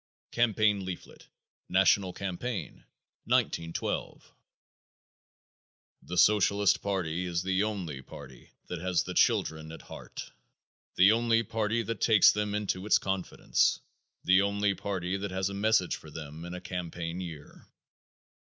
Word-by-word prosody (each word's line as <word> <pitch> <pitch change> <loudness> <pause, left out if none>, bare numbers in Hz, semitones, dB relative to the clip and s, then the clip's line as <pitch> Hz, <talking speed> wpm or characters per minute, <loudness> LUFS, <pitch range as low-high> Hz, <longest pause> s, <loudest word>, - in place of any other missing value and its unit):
Campaign 110 -4 +2
Leaflet, 95 -2 -8 0.4
National 95 0 +3
Campaign, 100 +4 -5 0.4
1912. 85 0 -1 1.7
The 90 - -6
Socialist 100 -1 +4
party 90 -3 -2
is 85 0 -1
the 95 0 +1
only 95 -10 -3
party 65 0 -12 0.2
that 90 - -5
has 90 -1 +1
the - - -6
children 80 0 +1
at 80 - -10
heart; - - -9 0.6
the 95 +3 +7
only 115 0 +2
party 115 +1 -1
that 115 -1 -5
takes 110 -4 +6
them 105 0 -2
into 100 -2 -2
its - - +6
confidence; 95 -2 0 0.4
the 95 +2 +5
only 100 0 +1
party 95 -1 -3
that 100 +1 -4
has 95 +1 -2
a - - -6
message 100 -2 +2
for 80 - -13
them 75 +1 -8
in 90 +1 -6
a 90 - -7
campaign 90 -1 -5
year. 80 -5 -10
95 Hz, 130 wpm, -29 LUFS, 90-105 Hz, 1.7 s, the